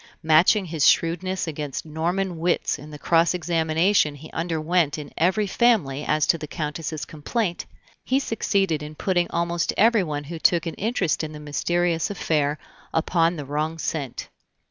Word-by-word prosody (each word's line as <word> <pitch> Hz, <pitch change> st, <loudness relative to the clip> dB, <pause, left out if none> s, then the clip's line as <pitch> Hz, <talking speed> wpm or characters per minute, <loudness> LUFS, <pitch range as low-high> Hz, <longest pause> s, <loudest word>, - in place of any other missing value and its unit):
Matching 165 Hz, +6 st, +4 dB
his 160 Hz, -4 st, +3 dB
shrewdness 180 Hz, +3 st, 0 dB
against 150 Hz, -4 st, -5 dB
Norman 170 Hz, +3 st, -2 dB
wits 175 Hz, +1 st, 0 dB
in 150 Hz, -, -11 dB
the 150 Hz, -, -9 dB
cross 165 Hz, +3 st, +2 dB
examination 165 Hz, -1 st, +2 dB
he 155 Hz, +3 st, -12 dB
underwent 165 Hz, -1 st, 0 dB
in 150 Hz, -2 st, -8 dB
every 190 Hz, +6 st, +2 dB
family 185 Hz, -, +2 dB
as 155 Hz, 0 st, +1 dB
to 165 Hz, -, +2 dB
the 150 Hz, -, -6 dB
Countess's 150 Hz, 0 st, -4 dB
complaint, 175 Hz, +5 st, -3 dB, 0.4 s
he 260 Hz, -, +1 dB
succeeded 195 Hz, -, 0 dB
in 150 Hz, +1 st, -8 dB
putting 175 Hz, 0 st, 0 dB
almost 170 Hz, 0 st, -1 dB
everyone 190 Hz, -10 st, +2 dB
who 165 Hz, +3 st, -7 dB
took 170 Hz, +1 st, +3 dB
an 165 Hz, -, -3 dB
interest 200 Hz, -7 st, -1 dB
in 155 Hz, 0 st, -5 dB
the 150 Hz, -, -8 dB
mysterious 165 Hz, +3 st, 0 dB
affair 150 Hz, -6 st, 0 dB, 0.3 s
upon 165 Hz, +1 st, +1 dB
the 145 Hz, -3 st, -6 dB
wrong 155 Hz, +3 st, -2 dB
scent. 145 Hz, -5 st, -4 dB
165 Hz, 155 wpm, -24 LUFS, 150-180 Hz, 0.4 s, Matching